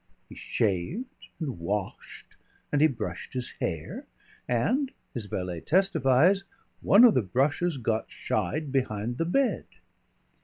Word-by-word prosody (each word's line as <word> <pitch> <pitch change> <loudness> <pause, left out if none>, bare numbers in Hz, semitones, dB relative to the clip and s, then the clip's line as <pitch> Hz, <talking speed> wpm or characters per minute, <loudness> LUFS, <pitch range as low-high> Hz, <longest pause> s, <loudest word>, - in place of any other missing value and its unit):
He - - -10
shaved 110 - -2
and 135 - -4
washed 100 +3 -5 0.4
and 145 - +2
he 155 - +7
brushed 90 - -5
his 125 -2 -3
hair, 80 -2 -4 0.4
and, 250 - +1 0.2
his 115 -4 -5
valet 90 -3 -3
testifies, 180 0 +3 0.4
one 205 +5 +6
of 240 - +8
the 130 - +3
brushes 140 - 0
got 115 -2 -2
"shied" 150 -1 -2
behind 120 -3 -1
the 165 - +1
bed. 235 +3 +1
135 Hz, 125 wpm, -27 LUFS, 105-175 Hz, 0.4 s, of